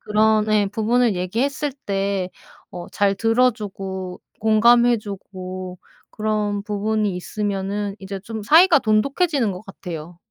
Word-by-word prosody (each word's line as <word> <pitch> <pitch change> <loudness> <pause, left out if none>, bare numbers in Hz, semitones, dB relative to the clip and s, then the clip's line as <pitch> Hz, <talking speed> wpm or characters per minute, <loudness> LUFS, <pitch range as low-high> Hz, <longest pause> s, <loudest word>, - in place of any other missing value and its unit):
그런 215 0 +2
예 210 -1 +3
부분을 225 +2 +1
얘기했을 265 +11 -1
때 195 -2 -1 0.4
어 175 -1 -6
잘 200 -1 +1
들어 230 +4 +3
주고 190 -4 -6 0.2
공감해 235 +2 +5
주고 185 -3 -7 0.3
그런 210 -1 -1
부분이 210 -1 -1
있으면은 200 +1 -3
이제 195 0 -6
좀 220 +1 -6
사이가 320 - +6
돈독해지는 260 - +1
것 180 - -7
같아요. 175 -3 -8
210 Hz, 270 characters per minute, -22 LUFS, 195-225 Hz, 0.4 s, 사이가